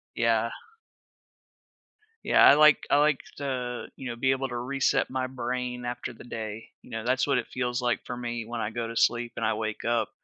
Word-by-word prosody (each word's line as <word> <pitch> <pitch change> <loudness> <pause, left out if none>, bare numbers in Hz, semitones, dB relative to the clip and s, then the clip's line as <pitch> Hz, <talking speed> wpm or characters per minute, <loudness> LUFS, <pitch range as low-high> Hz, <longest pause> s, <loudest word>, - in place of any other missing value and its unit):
Yeah. 115 0 +2 1.8
Yeah. - - +4
I - - +10
like 150 0 +5
I - - +5
like 150 -1 +3 0.2
to, 125 -3 -3
you 130 - -6
know, 120 - -4
be 130 +3 +2
able 135 0 0
to 120 - -5
reset 135 +3 +1
my 130 0 -2
brain 125 -1 -3
after 120 0 -4
the 110 - -13
day. 110 -2 -6
You - - -17
know, 115 0 -4
that's 130 +2 +1
what 140 -2 +3
it - - -2
feels 125 0 -2
like 120 -4 0
for 125 - -5
me 120 -2 -4
when 115 0 -4
I 105 - -1
go 115 0 -3
to 115 - -7
sleep 120 0 +2
and 115 - -2
I 110 - +2
wake 110 0 -4
up. 120 0 +1
120 Hz, 210 wpm, -27 LUFS, 115-130 Hz, 1.8 s, I